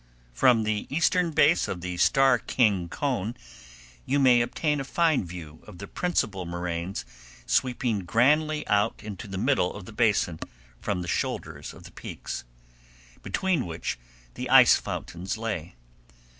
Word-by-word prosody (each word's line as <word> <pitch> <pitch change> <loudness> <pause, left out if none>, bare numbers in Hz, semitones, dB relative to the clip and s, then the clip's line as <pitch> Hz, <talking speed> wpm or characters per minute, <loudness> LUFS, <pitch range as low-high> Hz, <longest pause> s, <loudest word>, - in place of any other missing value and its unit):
From 115 - +4
the 105 -1 -2
eastern 170 +3 +2
base 155 +1 +3
of 90 - -4
the 90 0 -4
Starr 135 +4 +4
King 100 -10 +1
cone 120 - -2 0.7
you 140 - 0
may 125 -3 +5
obtain 150 +5 0
a - - -2
fine 160 0 +2
view 85 -3 -10
of - - -11
the 100 - -7
principal 100 - -1
moraines 85 +1 -4 0.4
sweeping 125 -4 +1
grandly 150 - +2
out 105 +1 +1
into 105 0 -7
the 95 -1 -5
middle 110 -4 +1
of 100 -2 -8
the 115 - -11
basin 105 -7 +1 0.4
from 90 - -2
the - - -7
shoulders - - -3
of - - -14
the - - -12
peaks, 60 - -7 0.8
between 180 - -1
which 80 -6 -4 0.3
the - - -5
ice - - +8
fountains 90 +5 -4
lay. 105 - -4
110 Hz, 145 wpm, -26 LUFS, 90-135 Hz, 0.8 s, ice